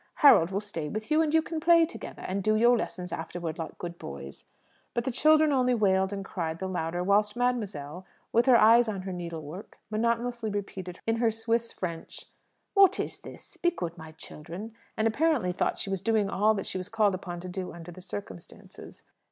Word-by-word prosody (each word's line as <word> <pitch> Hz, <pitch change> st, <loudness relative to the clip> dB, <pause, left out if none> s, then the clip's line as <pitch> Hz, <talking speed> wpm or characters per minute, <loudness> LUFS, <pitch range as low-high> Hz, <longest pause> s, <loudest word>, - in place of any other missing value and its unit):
Harold 165 Hz, -, +8 dB
will 195 Hz, +1 st, -1 dB
stay 170 Hz, -8 st, -5 dB
with 215 Hz, -, -5 dB
you, 310 Hz, +1 st, +5 dB
and 310 Hz, -2 st, +1 dB
you 320 Hz, 0 st, +4 dB
can 325 Hz, -1 st, -4 dB
play 335 Hz, +1 st, +6 dB
together, 335 Hz, -, -9 dB
and 195 Hz, +2 st, -2 dB
do 215 Hz, +2 st, +2 dB
your 240 Hz, +3 st, +5 dB
lessons 180 Hz, -6 st, -4 dB
afterwards, 165 Hz, 0 st, -5 dB
like 165 Hz, -, -6 dB
good 175 Hz, -1 st, -7 dB
boys." 70 Hz, 0 st, -8 dB, 0.5 s
But 235 Hz, -, 0 dB
the 260 Hz, -, -1 dB
children 310 Hz, +4 st, +4 dB
only 250 Hz, -2 st, +3 dB
wailed 190 Hz, -3 st, +2 dB
and 195 Hz, -1 st, -5 dB
cried 165 Hz, -5 st, -3 dB
the 190 Hz, -, -4 dB
louder, 175 Hz, -1 st, -2 dB
whilst 205 Hz, +3 st, +2 dB
mademoiselle, 200 Hz, -10 st, -2 dB, 0.3 s
with 235 Hz, +3 st, +3 dB
her 250 Hz, -2 st, +8 dB
eyes 230 Hz, +2 st, +6 dB
on 200 Hz, -3 st, -3 dB
her 190 Hz, -1 st, -5 dB
needlework, 170 Hz, 0 st, -7 dB
monotonously 235 Hz, +1 st, 0 dB
repeated 190 Hz, -3 st, -5 dB
in 225 Hz, 0 st, +1 dB
her 230 Hz, 0 st, +3 dB
Swiss 225 Hz, +1 st, -1 dB
French, 170 Hz, -3 st, -6 dB, 0.5 s
"What 395 Hz, -2 st, +5 dB
is -, -, -3 dB
this? 350 Hz, -, -12 dB
Be 345 Hz, 0 st, +2 dB
good, 175 Hz, -, -5 dB
my 160 Hz, -2 st, -11 dB
children," 170 Hz, +7 st, -9 dB, 0.2 s
and 220 Hz, -, +2 dB
apparently 255 Hz, -, +1 dB
thought 180 Hz, -, -1 dB
she 195 Hz, -, -4 dB
was 195 Hz, -2 st, -1 dB
doing 215 Hz, -3 st, +1 dB
all 215 Hz, +2 st, +3 dB
that 195 Hz, -, -3 dB
she 185 Hz, -, -3 dB
was 185 Hz, +2 st, -7 dB
called 210 Hz, -3 st, +2 dB
upon 180 Hz, -2 st, -5 dB
to 185 Hz, -, -7 dB
do 180 Hz, 0 st, -5 dB
under 170 Hz, 0 st, -10 dB
the 185 Hz, -, -11 dB
circumstances. 100 Hz, -, -10 dB
200 Hz, 200 wpm, -28 LUFS, 175-235 Hz, 0.5 s, Harold